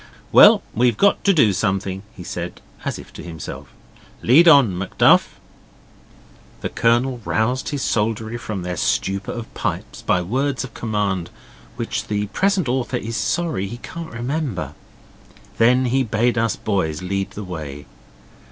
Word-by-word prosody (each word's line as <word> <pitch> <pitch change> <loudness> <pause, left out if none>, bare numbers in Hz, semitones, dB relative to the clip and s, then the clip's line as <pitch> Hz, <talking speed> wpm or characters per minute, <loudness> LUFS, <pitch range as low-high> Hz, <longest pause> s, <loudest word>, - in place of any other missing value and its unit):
'Well, - - +8
we've 120 -1 +2
got 200 - +3
to 200 - +6
do 130 - +4
something,' 95 -1 -1
he 90 - -9
said, 85 0 -6 0.2
as - - -3
if - - -12
to - - -9
himself. 80 -4 -8 0.6
'Lead 155 +9 +6
on, 140 - +6
Macduff.' 95 +2 +3 1.2
The - - -2
Colonel 120 +2 +1
roused 125 +6 0
his 145 -2 -3
soldiery 110 +1 -1
from 105 -6 -5
their 90 -1 -4
stupor 100 +4 -1
of 120 -1 -7
pipes - - -4
by 90 - +1
words 130 +8 -1
of 135 - -9
command 100 -6 -2 0.5
which 120 -1 -3
the 105 -1 -1
present 195 -5 +1
author 125 0 -1
is 115 -1 -5
sorry 160 - -1
he 120 +5 -7
can't 165 +6 -8
remember. 120 - -3 0.9
Then 125 +3 +4
he 130 +2 +2
bade 115 +1 +1
us 115 -1 +1
boys 90 -6 -2
lead 95 +1 -2
the 105 - -4
way. 75 -6 -7
115 Hz, 150 wpm, -21 LUFS, 95-130 Hz, 1.2 s, Well